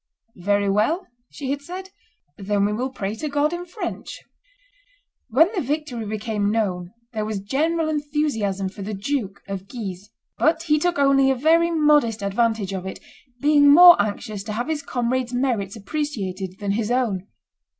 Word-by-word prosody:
"Very 200 Hz, +2 st, +1 dB
well," 220 Hz, -, +1 dB, 0.2 s
she 275 Hz, -2 st, -5 dB
had 285 Hz, 0 st, -2 dB
said, 370 Hz, +5 st, -8 dB, 0.4 s
"then 200 Hz, 0 st, 0 dB
we 210 Hz, -, 0 dB
will 250 Hz, +5 st, -2 dB
pray 205 Hz, -6 st, -4 dB
to 300 Hz, +7 st, -4 dB
God 290 Hz, +3 st, +1 dB
in 350 Hz, +1 st, -5 dB
French." 390 Hz, +5 st, -6 dB, 1.1 s
When 320 Hz, -, +4 dB
the 375 Hz, -, -1 dB
victory 275 Hz, -5 st, -3 dB
became 210 Hz, -1 st, -1 dB
known 185 Hz, -5 st, -1 dB, 0.2 s
there 215 Hz, -1 st, -2 dB
was 215 Hz, -1 st, -3 dB
general 310 Hz, +10 st, 0 dB
enthusiasm 290 Hz, -11 st, -1 dB
for 200 Hz, -, -11 dB
the 205 Hz, +2 st, -4 dB
Duke. 205 Hz, -2 st, -3 dB
of 195 Hz, -1 st, -6 dB
Guise; 200 Hz, -4 st, -7 dB, 0.3 s
but 325 Hz, +1 st, +2 dB
he 305 Hz, -2 st, +2 dB
took 350 Hz, +2 st, 0 dB
only 275 Hz, -1 st, +4 dB
a 265 Hz, -, +3 dB
very 325 Hz, +6 st, +3 dB
modest 295 Hz, -9 st, +3 dB
advantage 205 Hz, -1 st, 0 dB
of 190 Hz, -1 st, -4 dB
it, 190 Hz, -, -6 dB, 0.4 s
being 290 Hz, 0 st, +5 dB
more 350 Hz, +3 st, +10 dB
anxious 205 Hz, 0 st, -4 dB
to 215 Hz, -, -4 dB
have 240 Hz, +7 st, -3 dB
his 310 Hz, -2 st, -1 dB
comrades' 250 Hz, -2 st, -2 dB
merits 235 Hz, -6 st, -1 dB
appreciated 200 Hz, -, -4 dB
than 200 Hz, -1 st, -2 dB
his 215 Hz, +1 st, -1 dB
own. 225 Hz, -7 st, 0 dB
240 Hz, 165 wpm, -23 LUFS, 205-295 Hz, 1.1 s, more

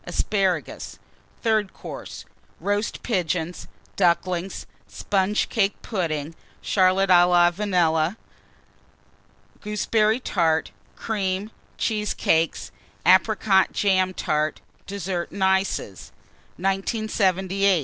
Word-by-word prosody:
Asparagus. 190 Hz, -5 st, -2 dB, 0.5 s
THIRD 215 Hz, -4 st, +1 dB
COURSE. -, -, -9 dB, 0.3 s
Roast 205 Hz, +2 st, -2 dB
Pigeons. 180 Hz, -5 st, -2 dB, 0.3 s
Ducklings. 180 Hz, +1 st, 0 dB, 0.2 s
Sponge 200 Hz, +1 st, 0 dB
cake 205 Hz, -4 st, 0 dB
Pudding. 165 Hz, -7 st, -3 dB, 0.3 s
Charlotte 190 Hz, 0 st, +2 dB
à 175 Hz, 0 st, +6 dB
la 175 Hz, -1 st, +5 dB
Vanille. 175 Hz, -3 st, +1 dB, 1.5 s
Gooseberry 215 Hz, +2 st, +1 dB
Tart. 165 Hz, -9 st, 0 dB, 0.2 s
Cream. 200 Hz, -1 st, -2 dB, 0.3 s
Cheesecakes. 210 Hz, -7 st, 0 dB, 0.3 s
Apricot 190 Hz, +1 st, +4 dB
jam 185 Hz, -2 st, +2 dB
Tart. 155 Hz, -1 st, -1 dB, 0.3 s
DESSERT 190 Hz, -3 st, -3 dB
AND 200 Hz, -, -4 dB
ICES. 190 Hz, -, 0 dB, 0.5 s
1978. 195 Hz, -1 st, +1 dB
190 Hz, 80 wpm, -24 LUFS, 175-205 Hz, 1.5 s, à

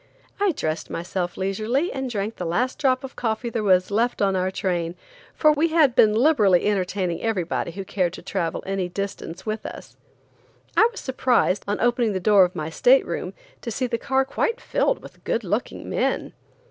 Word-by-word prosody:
I 405 Hz, -1 st, +3 dB
dressed 155 Hz, -, -3 dB
myself 175 Hz, +1 st, -3 dB
leisurely 215 Hz, -, -1 dB
and 265 Hz, -1 st, -3 dB
drank 215 Hz, -1 st, -3 dB
the 180 Hz, -, -4 dB
last 245 Hz, +10 st, -1 dB
drop 260 Hz, -3 st, +2 dB
of 270 Hz, -, -8 dB
coffee 230 Hz, 0 st, -2 dB
there 230 Hz, -, -1 dB
was 185 Hz, -2 st, +3 dB
left 235 Hz, +4 st, +1 dB
on 195 Hz, -2 st, +2 dB
our 185 Hz, 0 st, +1 dB
train, 175 Hz, -3 st, -2 dB, 0.4 s
for 305 Hz, -, +5 dB
we 305 Hz, +2 st, +2 dB
had 315 Hz, -6 st, +4 dB
been 215 Hz, -2 st, +5 dB
liberally 220 Hz, -, +4 dB
entertaining 185 Hz, -3 st, -1 dB
everybody 190 Hz, -7 st, -1 dB
who 195 Hz, +1 st, -6 dB
cared 180 Hz, -3 st, -1 dB
to -, -, -9 dB
travel 175 Hz, -3 st, -2 dB
any 195 Hz, -2 st, -2 dB
distance 190 Hz, -2 st, -5 dB
with 215 Hz, 0 st, -3 dB
us. -, -, -9 dB, 0.8 s
I 450 Hz, -, +6 dB
was 455 Hz, -, -8 dB
surprised, 250 Hz, -7 st, +1 dB
on 205 Hz, -, -1 dB
opening 240 Hz, -2 st, +2 dB
the 190 Hz, -, -1 dB
door 195 Hz, 0 st, +6 dB
of 180 Hz, +1 st, -6 dB
my 155 Hz, -1 st, -4 dB
state -, -, +4 dB
room, -, -, -4 dB, 0.3 s
to 235 Hz, -, -5 dB
see 245 Hz, +3 st, -1 dB
the 235 Hz, -1 st, -2 dB
car 265 Hz, 0 st, +1 dB
quite 460 Hz, -, -1 dB
filled -, -, 0 dB
with -, -, -14 dB
good -, -, -1 dB
looking -, -, -3 dB
men. -, -, -1 dB
210 Hz, 190 wpm, -23 LUFS, 185-255 Hz, 0.8 s, I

